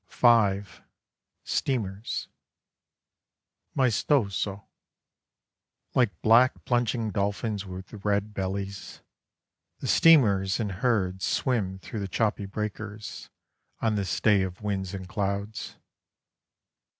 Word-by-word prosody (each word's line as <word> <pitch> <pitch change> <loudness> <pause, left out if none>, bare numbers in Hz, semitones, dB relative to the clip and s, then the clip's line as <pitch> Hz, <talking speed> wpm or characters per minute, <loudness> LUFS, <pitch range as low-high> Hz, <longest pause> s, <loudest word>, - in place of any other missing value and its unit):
(5) 100 -4 +3 0.6
STEAMERS 110 -6 -2 1.5
Maestoso. 105 -6 +1 1.3
Like 120 -5 +2
black 120 +4 +5
plunging 120 -2 0
dolphins 100 +1 -2
with 95 +2 -9
red 105 0 0
bellies, 100 0 -4 0.8
The - - -8
steamers 100 -13 +5
in 110 -3 -1
herds 95 -2 0
Swim 105 -8 0
through 110 +4 -7
the 100 - -3
choppy 105 +1 0
breakers 105 +1 -6 0.5
On 110 -1 +1
this 100 -4 -1
day 105 -3 +4
of 95 +1 -4
winds 100 -2 -2
and 95 -1 -7
clouds. 100 +1 -3
100 Hz, 90 wpm, -27 LUFS, 95-115 Hz, 1.5 s, black